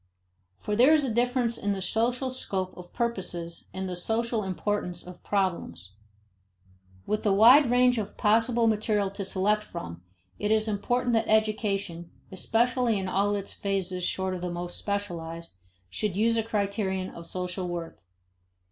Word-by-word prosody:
For 210 - -3
there 255 +8 +6
is 305 -2 +4
a 255 -5 -1
difference 245 0 +1
in 205 0 0
the 195 - -4
social 245 +6 0
scope 190 -7 -3
of 180 -1 -11
purposes 180 -8 -3
and 190 0 -4
the 180 - -4
social 225 +5 -1
importance 185 -2 -2
of 180 0 -12
problems. 170 - -2 1.1
With 215 - -1
the 205 - +2
wide 240 +7 +7
range 250 0 +4
of 205 -2 -6
possible 230 +2 +3
material 210 -2 +1
to 200 0 -5
select 200 +3 +1
from, 85 - -8 0.4
it 210 - -1
is 220 0 +3
important 240 +4 0
that 225 -1 +2
education 205 -5 0 0.2
(especially 235 +3 +1
in 190 -1 -3
all 200 +2 +1
its 200 -1 -4
phases 190 -2 -2
short 190 +1 -1
of 180 - -5
the 180 - -2
most 175 0 -4
specialized) 170 -5 -4 0.4
should 205 -4 -2
use 230 +2 +3
a 225 - +2
criterion 200 -3 -2
of 170 0 -10
social 180 0 -3
worth. 170 - -6
205 Hz, 155 wpm, -27 LUFS, 185-225 Hz, 1.1 s, wide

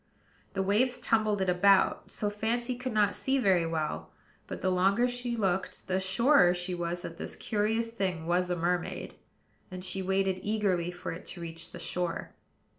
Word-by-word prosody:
The 195 - 0
waves 235 +6 +2
tumbled 215 -3 +1
it 190 - 0
about, 190 +2 +4
so 205 -1 -1
Fancy 235 +4 -1
could 250 +1 -4
not 210 -2 +3
see 270 +1 0
very 190 -9 +3
well: 160 -2 -2 0.4
but, - - -6
the 185 - +2
longer 195 +6 +3
she 245 -1 -3
looked, 190 -3 -1
the 185 0 0
surer 190 0 +4
she 175 +1 -3
was 175 0 -3
that 165 - -7
this - - -6
curious 225 +2 0
thing 185 -7 -2
was 180 +1 +1
a 180 - +1
mermaid; 175 +1 -2 0.6
and 185 -1 -6
she 190 +1 -1
waited 190 0 +1
eagerly 200 -5 0
for 175 0 -6
it 165 - -8
to 175 - -6
reach 165 0 -7
the - - -8
shore. 175 -2 -3
190 Hz, 180 wpm, -30 LUFS, 175-220 Hz, 0.6 s, about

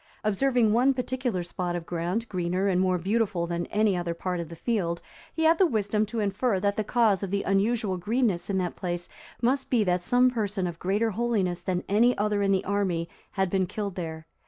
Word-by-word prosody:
Observing 225 +1 +2
one 260 +4 +4
particular 250 -6 -2
spot 175 0 -3
of 170 -1 -4
ground 175 +7 -2
greener 185 0 -1
and 185 -2 +2
more 185 -1 +2
beautiful 195 -1 0
than 170 0 -3
any 210 -2 +2
other 175 -1 -2
part 180 +1 -3
of 170 -2 -5
the 170 - -8
field, 170 -5 -1 0.3
he 320 - -2
had 320 +1 +4
the 380 - +6
wisdom 215 -3 0
to 225 +2 -4
infer 205 +1 0
that 200 +1 0
the 215 - 0
cause 215 -4 +2
of 195 - -3
the 200 +1 -1
unusual 200 0 +1
greenness 210 -1 0
in 195 - 0
that 180 -2 -1
place 175 -1 -4 0.4
must 265 +3 +1
be 235 -4 +3
that 180 -2 +1
some 250 +6 +3
person 205 -5 -1
of 170 -1 -5
greater 205 +5 +1
holiness 200 -6 0
than 180 0 -2
any 235 +5 +3
other 210 0 +1
in 195 -1 +2
the 190 -1 +1
army 190 -4 0 0.3
had 190 -1 +1
been 185 0 0
killed 205 0 -4
there. 160 -3 -6
200 Hz, 210 wpm, -27 LUFS, 180-225 Hz, 0.4 s, the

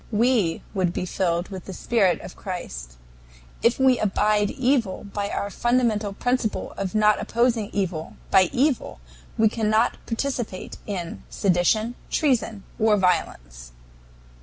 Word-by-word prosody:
We 220 -6 +2
would 185 -4 0
be - - -2
filled 175 -1 -1
with 190 -3 -7
the 190 - -7
spirit 195 -7 +2
of - - -9
Christ. 60 - -6 0.7
If 235 +1 +3
we 260 -2 +4
abide 210 0 +2
evil 255 -7 0
by 200 0 -4
our 200 0 -3
fundamental 235 -3 +1
principle 245 +1 -1
of 195 +1 -4
not 210 0 +4
opposing 230 -3 +1
evil 180 -5 -3 0.2
by 190 -3 +5
evil 260 - 0 0.4
we 220 - +5
cannot 220 +1 +1
participate 235 -5 -3
in 180 -5 -4
sedition, 200 +5 +1 0.2
treason, 235 -8 0 0.2
or 215 -1 +4
violence. - - -1
210 Hz, 130 wpm, -24 LUFS, 185-235 Hz, 0.7 s, by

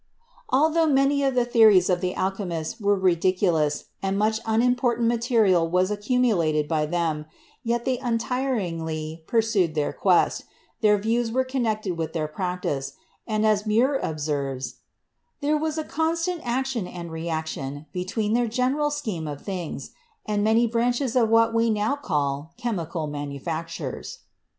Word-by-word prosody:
Altho 315 +5 +3
many 280 0 +3
of 270 -2 +1
the 245 -1 +3
theories 220 -6 +6
of 180 -1 +1
the 180 -1 -1
alchemists 185 -4 -3
were 205 -2 +2
ridic 185 0 +2
ulous 155 -6 +2 0.2
and 195 0 -1
much 215 +1 +1
unimportant 240 +1 +2
material 225 -8 +3
was 185 +3 +2
accumulated 205 - +1
by 150 -1 0
them, 160 -2 -1 0.4
yet 235 0 -1
they 255 -2 0
untiringly 180 - -2
pursued 220 -8 +1
their 150 -1 0
quest, 185 -3 +2 0.4
their 210 -2 +5
views 225 +3 0
were 260 +2 +2
connected 220 -8 -2
with 160 - -3
their 155 -2 -1
practice, 155 -5 -3 0.3
and, 215 -1 +1
as 215 0 +2
Muir 250 +6 +3
observes, 145 -4 -3 0.6
"there 295 +1 +1
was 310 +1 -1
a 315 - -1
constant 330 +3 -1
action 245 -4 -1
and 170 -2 -7
reaction 160 -3 -4
be 180 - -2
tween 210 +3 -1
their 240 0 +2
general 260 +6 +1
scheme 220 - -3
of 145 -1 -6
things 185 -5 -5 0.3
and 205 -1 0
many 225 +2 +4
branches 240 +2 0
of 235 -3 +4
what 230 0 +4
we 230 0 +2
now 215 +4 +1
call 150 - -2
chemical 175 -9 -3
manufactures." 145 +3 -5
210 Hz, 145 wpm, -25 LUFS, 165-240 Hz, 0.6 s, theories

